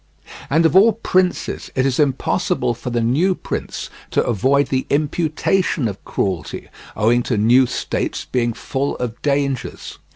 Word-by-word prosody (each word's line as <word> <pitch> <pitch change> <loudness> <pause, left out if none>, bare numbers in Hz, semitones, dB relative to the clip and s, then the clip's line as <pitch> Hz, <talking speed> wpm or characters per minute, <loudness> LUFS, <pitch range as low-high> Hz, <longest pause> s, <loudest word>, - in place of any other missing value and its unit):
And 160 +4 +3
of 160 - +3
all 210 +4 +7
princes, 185 -4 0
it 130 - +2
is 135 -2 0
impossible 135 -3 +1
for 120 +2 -6
the 120 -1 0
new 160 +11 +2
prince - - -5 0.2
to - - +1
avoid 135 +5 +2
the 130 -1 -1
imputation 155 0 0
of 100 -2 -7
cruelty, 90 -6 -3 0.3
owing 115 +3 +3
to 120 -1 -1
new 120 +5 +5
states - - -3
being 120 -2 0
full 140 +4 -3
of 120 -2 -5
dangers. 140 -3 -2
135 Hz, 150 wpm, -20 LUFS, 120-155 Hz, 0.3 s, all